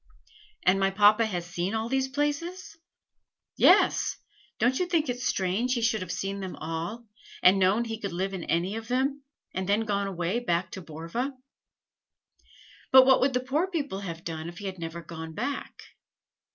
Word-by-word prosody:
"And 185 +2 +4
my 195 0 +3
papa 210 +3 +5
has 175 -5 -3
seen 180 +3 -3
all 220 +1 -1
these 265 +1 0
places?" 295 +6 -3 0.8
"Yes. - - +4 0.4
Don't 255 +2 +2
you 360 - 0
think 325 -5 +1
it 245 0 -3
strange 235 +2 0
he 235 - -1
should 225 -3 +1
have 185 -2 -5
seen 195 +1 -3
them 190 -2 -5
all, 165 +9 -5 0.4
and 190 +2 +7
known 195 +5 +3
he 225 -1 -5
could 200 -4 -4
live 190 +3 -2
in 185 -3 -4
any 180 +6 0
of 225 0 -7
them, 270 +3 0 0.3
and 185 +1 -3
then 205 +2 +3
gone 200 -2 -1
away 185 +3 -1
back 175 -6 -1
to 190 - -7
Borva?" 165 - -4 1.6
"But 260 0 +9
what 265 0 +5
would 265 +1 +3
the 250 - +2
poor 290 +8 0
people 285 - -3
have 170 -4 -6
done 160 0 -5
if 175 - -11
he 205 - -8
had 190 -2 -5
never 165 0 -6
gone 160 -1 -8
back?" 280 - -4
205 Hz, 180 wpm, -27 LUFS, 180-255 Hz, 1.6 s, But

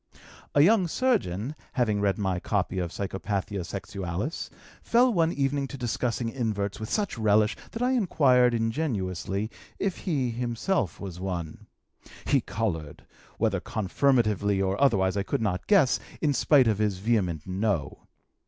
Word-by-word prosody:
"A 145 - +6
young 195 0 +4
surgeon, 155 - 0 0.2
having 110 -6 +1
read 100 -1 +1
my 95 -3 -1
copy 95 -1 -1
of 85 -1 -2
Psychopathia 100 +1 -3
Sexualis, 95 - -4 0.3
fell 245 +1 +3
one 165 -3 +2
evening 140 -1 0
to 140 - -8
discussing 120 -1 -1
inverts 110 -5 -2
with 110 - -5
such 205 - -1
relish 105 0 +3
that 230 - -4
I 250 - +2
inquired 130 - +3
ingenuously 110 - -2 0.3
if 195 -3 -1
he 140 -9 -1
himself 120 - -1
was 95 -3 -7
one. 90 -4 -5 0.6
He 140 - +3
colored, 80 -11 -4 0.3
whether 105 -4 +1
confirmatively 105 -1 +1
or 95 +4 0
otherwise 95 -9 +3
I 100 - +1
could 100 - -2
not 100 -5 -2
guess, 185 -11 +4 0.2
in 150 -2 +1
spite 135 0 +4
of 110 -2 +1
his 105 -3 +1
vehement 95 -7 0
no. 95 -6 -2
110 Hz, 145 wpm, -27 LUFS, 95-140 Hz, 0.6 s, A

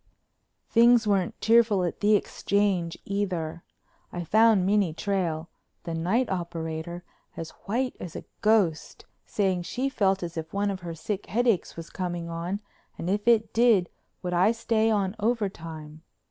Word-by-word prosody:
Things 235 0 +5
weren't 195 -4 0
cheerful 220 -4 +4
at 175 - -3
the 210 +1 +4
Exchange 195 -4 0
either. 175 -5 -2 0.5
I 175 - -4
found 220 0 +4
Minnie 195 -5 +2
Trail, 170 -5 -1 0.4
the 170 - -4
night 185 +10 +1
operator, 170 -1 -4 0.3
as 165 -1 -6
white 250 +5 -1
as 170 - -8
a - - -7 0.2
ghost, 210 -7 +1 0.2
saying 190 -3 0
she 250 +10 -2
felt 195 -7 +1
as 170 -1 -6
if 160 0 -5
one 200 0 0
of 190 - -5
her 170 -2 -6
sick 195 +5 -4
headaches 235 -4 +1
was 165 0 -8
coming 175 -2 -4
on 170 +5 -3 0.4
and 175 - -2
if 205 +2 -1
it 225 -2 +3
did 225 -7 +4 0.3
would 180 0 -2
I 180 +5 +4
stay 225 -1 +1
on 200 -2 0
over 220 -1 +1
time? 155 -3 -10
190 Hz, 155 wpm, -27 LUFS, 170-215 Hz, 0.5 s, Things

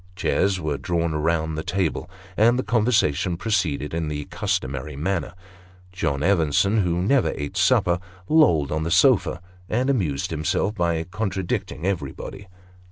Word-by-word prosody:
Chairs 95 +1 +1
were 75 -4 -2
drawn 85 -2 -1
round 80 0 0
the 80 - -2
table, 90 0 -2 0.3
and 115 +3 +4
the 130 - 0
conversation 105 - +1
proceeded 85 -9 -1
in 80 -1 -2
the 75 -1 -4
customary 75 - -2
manner. 85 +4 -2 0.6
John 70 -6 -2
Evenson, 95 +3 +2
who 90 -2 0
never 130 +6 +2
ate 75 0 -5
supper, 85 0 +3 0.3
lolled 85 - +4
on 80 +1 -1
the 80 - -2
sofa, 105 -3 +3 0.3
and 125 +5 +1
amused 85 - -1
himself 90 +6 0
by 85 -4 0
contradicting 95 -3 -3
everybody. 95 +2 -4
85 Hz, 140 wpm, -23 LUFS, 80-100 Hz, 0.6 s, and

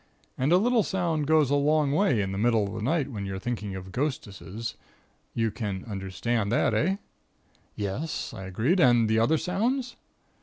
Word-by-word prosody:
And 135 +4 0
a 180 - +7
little 235 +4 +3
sound 170 -7 -1
goes 155 -3 +4
a - - +4
long 145 0 +2
way 145 - +2
in 95 - -3
the 95 - -3
middle 115 -2 +3
of 100 - -7
the 110 - -5
night 140 +3 0
when 100 -4 -4
you're 95 0 -4
thinking 105 -2 -4
of 95 0 -8
'ghostesses.' 115 - -4 0.6
You 115 -1 +1
can 100 -4 -4
understand 100 +2 -2
that 120 - +2
eh?" 170 - +2 0.8
"Yes," 110 +11 -3
I 95 - -7
agreed. 115 - +1
"And 120 -7 +5
the 110 +1 +2
other 135 +8 +3
sounds?" 235 - -1
120 Hz, 180 wpm, -27 LUFS, 105-155 Hz, 0.8 s, a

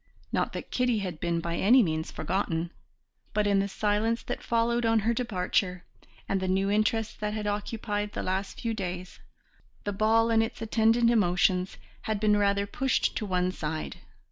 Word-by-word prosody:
Not - - 0
that - - -7
Kitty 250 -2 +1
had 180 -6 -4
been 170 -1 -1
by 170 0 -3
any 240 +5 +6
means 160 -3 -2
forgotten, 170 -2 -2 0.6
but 210 0 +2
in 200 -1 +3
the 195 - +1
silence 210 +3 0
that - - -4
followed 235 +1 +1
on 225 -1 +3
her 230 +3 +1
departure, 185 -5 -1 0.4
and 195 - 0
the 190 - -2
new 195 +2 +1
interest 215 +1 0
that 210 0 -2
had 215 -1 -3
occupied 205 0 -2
the - - -3
last 190 +1 -2
few 230 -1 -1
days, 185 -3 -5 0.6
the 205 - -2
ball 225 +3 +3
and 225 0 +4
its 225 - -3
attendant 225 +1 +3
emotions 180 -3 +2 0.2
had 215 -2 -2
been 210 0 +3
rather 200 -1 +2
pushed 260 +6 0
to 215 - -3
one 180 -1 +1
side. 155 -3 -4
205 Hz, 175 wpm, -28 LUFS, 185-225 Hz, 0.6 s, any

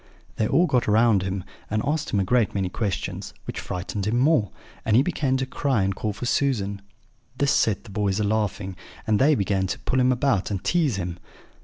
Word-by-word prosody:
They 110 - +1
all 175 - +4
got 130 -7 +1
round 110 -1 +4
him, 95 0 -3 0.3
and 105 +1 0
asked 150 +2 -1
him 100 - +1
a - - +2
great 115 +2 +1
many 95 -2 0
questions, 100 0 -3
which - - -5
frightened 95 +2 -4
him 115 +3 +1
more; 130 - +3 0.3
and 110 - +2
he 130 - +6
began 140 -6 0
to 130 - -1
cry 130 -5 0
and 95 0 0
call 105 +2 -2
for 105 +4 -6
Susan. 105 -7 0 0.6
This 140 0 +2
set 105 -8 +2
the 110 - -12
boys 100 0 0
a - - +1
laughing, 100 -2 -1 0.3
and 110 -1 +2
they 145 +3 +5
began 95 -3 0
to 90 - -3
pull 130 - 0
him 130 0 +4
about 125 -6 +1
and 100 -3 -3
tease 160 - +2
him. 90 -2 -4
110 Hz, 210 wpm, -24 LUFS, 100-130 Hz, 0.6 s, he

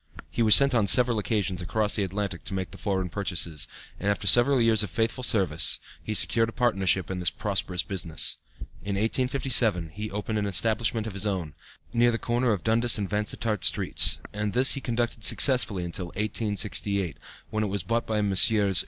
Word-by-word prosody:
He - - -3
was 110 -2 +8
sent 140 -1 +5
on 115 -4 +1
several 120 +3 +4
occasions 100 -4 -2
across 105 +5 -1
the 105 - 0
Atlantic 95 -1 -5
to 95 - -4
make 95 -1 -5
the - - -11
foreign 95 -3 -2
purchases, 85 -6 -3 0.3
and 100 - -2
after 100 -1 -2
several 125 +6 +4
years 115 -2 +3
of 105 - -2
faithful 115 +2 -2
service 90 -10 +2 0.3
he 110 - -4
secured 115 +2 +3
a - - -7
partnership 95 -7 0
in 95 - -4
this 90 - +2
prosperous 95 -4 -2
business. 85 -5 -2 0.5
In 100 0 -4
1857 115 -5 +2
he 105 +7 -7
opened 105 +2 -4
an 105 - -2
establishment 110 +3 +1
of 110 - -6
his 100 +2 -3
own, 90 -7 -4 0.4
near 120 0 +3
the 115 - -1
corner 120 +1 -1
of 100 -4 -3
Dundas 115 +2 +2
and 100 -2 -3
Vansittart 105 +1 -2
Streets, - - +2 0.2
and 105 -1 -3
this 130 +3 +4
he 135 - -1
conducted 120 -2 -3
successfully 125 -10 +3
until 85 +1 -6
1868, 100 - -2 0.3
when 110 0 -2
it - - -2
was 100 -2 -3
bought 115 +5 -2
by 110 -1 -1
Messrs. 100 -1 +3
105 Hz, 190 wpm, -25 LUFS, 95-115 Hz, 0.5 s, was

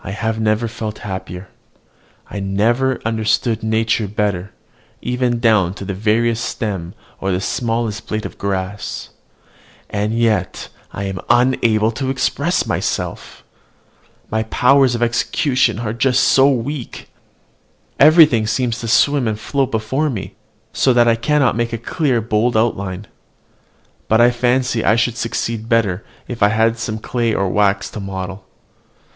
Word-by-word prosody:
I - - -6 0.3
never 110 +1 +1
felt 110 -1 -5
happier, 95 -1 -6 0.8
I 100 - -6
never 115 +7 +1
understood 110 0 0
nature 110 0 0
better, 100 -2 -2 0.5
even 125 -1 -1
down 105 -6 +2
to 100 - -7
the 100 - -3
veriest 110 +3 +1
stem 95 -7 -4 0.2
or 95 -1 -1
smallest 115 +1 -2
blade 110 0 -3
of - - -8
grass; 100 +1 -4 0.8
and 105 +1 -1
yet 115 -2 0 0.2
I 100 - -5
am 95 -2 -4
unable 120 -3 +3
to 130 +3 -3
express 135 0 0
myself: - - -3 0.9
my 110 0 +1
powers 125 +3 +3
of 120 - 0
execution 120 0 +1
are 110 -2 -3 0.2
so 135 +1 +5
weak, 135 0 -4 0.9
everything 150 -9 +6
seems 120 +1 -1
to 115 - -5
swim 140 +2 +3
and 110 -1 -2
float 135 +1 -1
before 130 +8 -1
me, 100 -6 -5 0.4
so 130 - +3
that 120 -1 +4
I 115 - +5
cannot 130 +1 +1
make 115 0 -1
a - - -1
clear, 125 +1 0
bold 110 +1 +1
outline. 100 -4 -1 1.0
But 110 - +3
I 120 +1 +6
fancy 125 -1 0
I 110 - +4
should 115 0 +1
succeed 115 -1 -3
better 105 -5 +1 0.2
if 120 -2 -7
I 100 - +6
had 115 +1 +1
some 110 -1 -3
clay 115 0 -1
or 100 - 0
wax 100 0 +1
to - - -7
model. 95 0 -6
115 Hz, 140 wpm, -18 LUFS, 105-120 Hz, 1.0 s, everything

